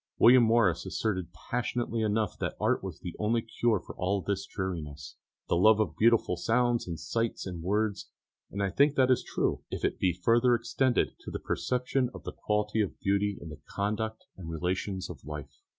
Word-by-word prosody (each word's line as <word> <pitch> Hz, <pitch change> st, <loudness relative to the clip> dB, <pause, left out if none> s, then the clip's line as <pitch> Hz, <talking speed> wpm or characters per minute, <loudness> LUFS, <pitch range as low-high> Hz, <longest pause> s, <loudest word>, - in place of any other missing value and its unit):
William 125 Hz, +2 st, +8 dB
Morris 110 Hz, -7 st, +3 dB
asserted 95 Hz, -3 st, -2 dB
passionately 120 Hz, +5 st, -2 dB
enough 110 Hz, -1 st, 0 dB
that -, -, -3 dB
art -, -, +1 dB
was 95 Hz, -4 st, -6 dB
the 90 Hz, -3 st, -5 dB
only 115 Hz, +2 st, +1 dB
cure 115 Hz, -2 st, +1 dB
for -, -, -10 dB
all 95 Hz, +2 st, 0 dB
this 100 Hz, +1 st, -3 dB
dreariness 75 Hz, -7 st, -5 dB, 0.3 s
the -, -, +2 dB
love 110 Hz, +5 st, +5 dB
of 90 Hz, -8 st, 0 dB
beautiful 115 Hz, -3 st, +3 dB
sounds 120 Hz, +5 st, +1 dB
and 85 Hz, -2 st, -4 dB
sights 115 Hz, 0 st, -2 dB
and 90 Hz, -3 st, -5 dB
words; 105 Hz, +3 st, -1 dB, 0.4 s
and 100 Hz, 0 st, -3 dB
I 100 Hz, -, 0 dB
think 140 Hz, +7 st, +3 dB
that 130 Hz, -1 st, +4 dB
is 130 Hz, -, +3 dB
true, -, -, -1 dB
if -, -, -3 dB
it -, -, -1 dB
be 95 Hz, -, +3 dB
further 115 Hz, +8 st, +3 dB
extended 120 Hz, +2 st, 0 dB
to -, -, -8 dB
a -, -, +1 dB
perception 125 Hz, 0 st, -1 dB
of -, -, -9 dB
the -, -, -6 dB
quality 105 Hz, +1 st, 0 dB
of 100 Hz, -, -3 dB
beauty 100 Hz, 0 st, +1 dB
in 80 Hz, -, -9 dB
the 80 Hz, -, -10 dB
conduct 110 Hz, +2 st, -2 dB
and 85 Hz, -3 st, -8 dB
relations 90 Hz, +3 st, -2 dB
of -, -, -10 dB
life. 75 Hz, -1 st, -8 dB
105 Hz, 190 wpm, -29 LUFS, 90-115 Hz, 0.4 s, William